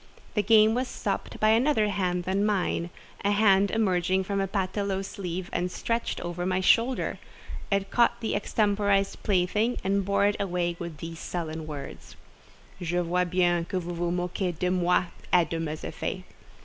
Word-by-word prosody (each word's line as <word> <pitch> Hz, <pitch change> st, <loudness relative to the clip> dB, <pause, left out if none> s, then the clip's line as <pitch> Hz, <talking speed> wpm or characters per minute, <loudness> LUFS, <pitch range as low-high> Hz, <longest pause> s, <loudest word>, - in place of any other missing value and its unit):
The 210 Hz, -, +2 dB
game 215 Hz, +1 st, +5 dB
was 250 Hz, +2 st, 0 dB
stopped -, -, -4 dB
by 215 Hz, -, +4 dB
another 225 Hz, -1 st, +3 dB
hand 180 Hz, -3 st, -1 dB
than 190 Hz, +3 st, 0 dB
mine—a 195 Hz, -1 st, -2 dB
hand 200 Hz, -1 st, +4 dB
emerging 190 Hz, -3 st, +1 dB
from 200 Hz, 0 st, -1 dB
a 195 Hz, -, 0 dB
paletôt 195 Hz, 0 st, -2 dB
sleeve 185 Hz, -3 st, -5 dB
and 180 Hz, +1 st, -1 dB
stretched 230 Hz, +4 st, -2 dB
over 175 Hz, 0 st, -4 dB
my 185 Hz, +1 st, +1 dB
shoulder; 235 Hz, +7 st, +2 dB, 0.5 s
it 200 Hz, 0 st, 0 dB
caught 235 Hz, 0 st, +3 dB
the 225 Hz, -, -2 dB
extemporised 205 Hz, -2 st, +1 dB
plaything 210 Hz, +5 st, +1 dB
and 195 Hz, +1 st, +1 dB
bore 200 Hz, +1 st, +2 dB
it 205 Hz, 0 st, +2 dB
away 175 Hz, -3 st, -1 dB
with 170 Hz, -3 st, -6 dB
these 165 Hz, +1 st, -7 dB
sullen 160 Hz, -3 st, -4 dB
words: 145 Hz, -3 st, -8 dB, 0.7 s
"Je 175 Hz, 0 st, -2 dB
vois 180 Hz, +1 st, +1 dB
bien 175 Hz, -1 st, +2 dB
que 185 Hz, +2 st, -2 dB
vous 175 Hz, 0 st, -5 dB
vous 170 Hz, 0 st, -1 dB
moquez 180 Hz, 0 st, -2 dB
de 180 Hz, +2 st, 0 dB
moi 180 Hz, 0 st, +3 dB, 0.3 s
et 175 Hz, -3 st, +4 dB
de 165 Hz, -, -1 dB
mes 155 Hz, -1 st, -4 dB
effets." -, -, -4 dB
190 Hz, 165 wpm, -27 LUFS, 175-205 Hz, 0.7 s, game